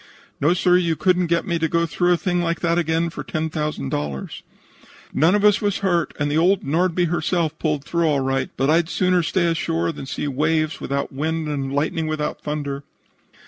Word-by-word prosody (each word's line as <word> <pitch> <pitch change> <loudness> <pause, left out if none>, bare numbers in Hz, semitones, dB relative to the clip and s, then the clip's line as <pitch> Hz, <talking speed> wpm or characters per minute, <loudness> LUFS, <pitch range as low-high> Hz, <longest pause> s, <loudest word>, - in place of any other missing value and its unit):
"No, 160 +5 +3
sir; 180 -1 +4
you 170 -3 +1
couldn't 180 +1 +2
get 170 0 +1
me 170 -2 -1
through 170 +2 +1
a - - +2
thing 175 -1 0
like 170 -1 -1
that 170 0 +2
again 165 0 0
for - - -6
$10,000. 150 - -3 0.7
None 165 +6 +4
of 210 0 +2
us 210 +2 +5
was 205 -2 0
hurt, 175 -4 0
and 145 0 0
the 155 - +2
old 185 +3 +3
Nordby 175 +4 +1
herself 165 -1 -1
pulled 150 -3 -1
through 170 +2 0
all 145 -3 +2
right, 135 0 -1
but 135 - +1
I'd 165 +2 +3
sooner 180 -1 +2
stay 170 +2 0
ashore 85 - 0
than 135 - -8
see 145 - -3
waves 155 +3 0
without 140 0 -2
wind 160 +3 -2
and 140 -2 -3
lightning 155 +3 -1
without 155 -1 -3
thunder." 145 -2 -4
160 Hz, 185 wpm, -22 LUFS, 150-175 Hz, 0.7 s, us